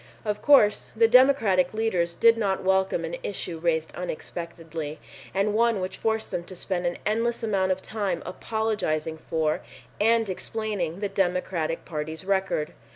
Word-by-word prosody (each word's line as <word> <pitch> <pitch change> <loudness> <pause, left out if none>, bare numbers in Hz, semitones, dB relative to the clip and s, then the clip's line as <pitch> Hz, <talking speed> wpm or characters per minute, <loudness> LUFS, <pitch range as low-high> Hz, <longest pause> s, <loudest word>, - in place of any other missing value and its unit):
Of 210 -1 -2
course, 245 -8 +5
the 225 0 +5
Democratic 225 -7 +4
leaders 180 -6 0
did 230 +5 +6
not 200 -4 -1
welcome 190 -2 +2
an 165 +1 -4
issue 180 -4 -4
raised 160 -1 0
unexpectedly, 165 -3 -5 0.3
and 200 +2 +1
one 230 -1 +3
which 185 0 -4
forced 220 0 -1
them 170 - -2
to 185 - -9
spend 175 0 -1
an 175 - -2
endless 230 +3 0
amount 195 -4 +1
of 185 0 -2
time 200 -5 -2
apologizing 185 -7 -2
for 155 -1 +1 0.4
and 225 +1 +3
explaining 195 -3 -3
the 205 - -1
Democratic 180 -4 -1
Party's 160 +2 -5
record. 190 -6 0
190 Hz, 150 wpm, -26 LUFS, 170-220 Hz, 0.4 s, did